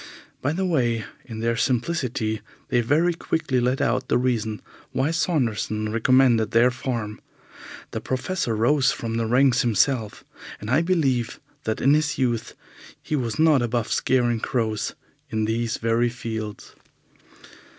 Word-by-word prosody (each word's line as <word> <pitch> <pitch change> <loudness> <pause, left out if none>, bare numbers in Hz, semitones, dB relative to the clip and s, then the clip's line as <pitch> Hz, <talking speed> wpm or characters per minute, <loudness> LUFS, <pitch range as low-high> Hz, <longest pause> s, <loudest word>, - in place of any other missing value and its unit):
By 145 - 0
the 190 +4 -1
way, 120 -10 +1 0.2
in 110 -2 -7
their 115 0 +1
simplicity 120 -4 -1 0.3
they 120 - +3
very 155 +9 +2
quickly 160 -5 -1
let 125 +2 +1
out 125 +2 0
the - - +2
reason 115 -4 -1 0.3
why 135 +4 +1
Saunderson 115 - 0
recommended 115 -1 +4
their 120 +2 +4
farm. 120 -4 -4 0.7
The - - -4
Professor 130 -1 -2
rose 135 +4 +3
from 115 -3 -3
the 115 -1 0
ranks 125 +1 +4
himself, 115 -1 +1 0.4
and 105 +3 -5
I 145 +5 +4
believe 140 -10 0 0.3
that 110 - -2
in 140 +3 +5
his 150 -1 +1
youth 120 -3 -1 0.4
he 155 - -3
was 120 -4 -2
not 155 -4 +4
above 120 -1 -1
scaring 120 -3 +2
crows 110 -4 -1 0.3
in 110 -1 -1
these 115 +1 -1
very 115 +1 +1
fields. 110 -3 -6
120 Hz, 140 wpm, -24 LUFS, 115-135 Hz, 0.7 s, in